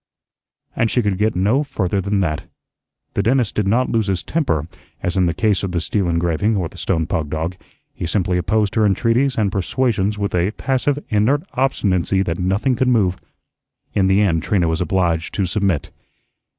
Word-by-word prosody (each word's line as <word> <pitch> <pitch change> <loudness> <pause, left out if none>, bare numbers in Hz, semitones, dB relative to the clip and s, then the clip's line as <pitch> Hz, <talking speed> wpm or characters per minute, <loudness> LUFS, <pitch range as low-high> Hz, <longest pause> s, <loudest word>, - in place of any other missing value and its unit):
And 115 - +1
she 125 - +1
could 100 -2 -1
get 110 +1 +1
no 105 +10 +2
further 100 -8 -1
than 100 +1 0
that. 75 -5 -2 0.6
The - - +1
dentist 120 +1 +1
did 105 -2 0
not 120 +5 +2
lose 110 -3 +1
his 95 -2 -1
temper, 80 - -1 0.4
as 90 - -1
in 95 -2 +3
the 85 - 0
case 105 -3 +1
of 95 -2 -3
the 85 - +1
steel 90 +2 -1
engraving 85 +6 +1
or 90 -4 -1
the - - -13
stone 80 -1 0
pug 80 -2 -2
dog; 80 +4 -3 0.4
he 85 - -4
simply 90 0 0
opposed 105 +2 +1
her 110 - +2
entreaties 115 +6 +2
and 105 -3 +1
persuasions 105 0 0
with 100 -2 -2
a 90 +1 +2
passive, 135 +3 0
inert 115 +8 +2
obstinacy 95 -8 +1
that 85 -1 -3
nothing 95 +8 +1
could 130 +2 +1
move. 100 -7 +2 0.8
In 95 -2 +2
the 95 +2 +4
end 85 -6 +2
Trina 90 -1 +1
was 80 +1 -1
obliged 85 -3 0
to 100 - +1
submit. 95 -3 -1
100 Hz, 190 wpm, -20 LUFS, 90-110 Hz, 0.8 s, the